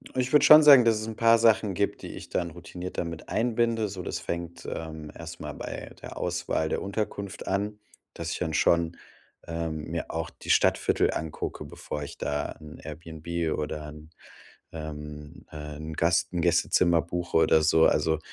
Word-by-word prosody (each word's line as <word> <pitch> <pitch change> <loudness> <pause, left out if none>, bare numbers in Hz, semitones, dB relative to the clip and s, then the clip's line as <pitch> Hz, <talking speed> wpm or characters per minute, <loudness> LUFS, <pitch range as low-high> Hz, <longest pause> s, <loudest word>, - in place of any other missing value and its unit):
Ich 130 0 0
würde 150 - +6
schon 155 0 +10
sagen, 140 -5 +9
dass 115 -1 +4
es 110 - -5
'n 110 - -5
paar 115 +1 +5
Sachen 110 -3 +4
gibt, 100 +2 -1
die - - -7
ich - - -9
dann 85 -2 -2
routiniert 90 +2 -7
damit 85 -2 -5
einbinde. 115 -1 +1
So, 95 -2 -6
das - - -3
fängt, 85 0 -5
ähm, 80 -2 -6
erstmal - - -7
bei - - -7
der - - -8
Auswahl 80 - -1
der - - -2
Unterkunft 100 -1 -4
an, 105 +2 -1 0.3
dass 85 -1 -5
ich - - -2
dann 80 -2 -2
schon, 85 +1 +2 0.5
ähm, 80 -2 -3
mir 85 0 -4
auch - - -3
die - - -4
Stadtviertel - - +3
angucke, 80 -1 -4
bevor 75 - -6
ich 70 - -9
da 75 0 -2
'n 75 0 -11
Airbnb 80 +1 -4
oder 75 0 -4
'n, 75 +1 -12 0.6
ähm, 75 -2 -8
äh, 75 -1 -7
'n 80 +1 -6
Gast 85 +1 +2
'n 90 -2 -1
Gästezimmer 85 +1 +3
buche 85 +1 -2
oder 80 -1 +4
so. 80 +1 +5
Also, 80 -1 +2
85 Hz, 175 wpm, -27 LUFS, 80-100 Hz, 0.6 s, schon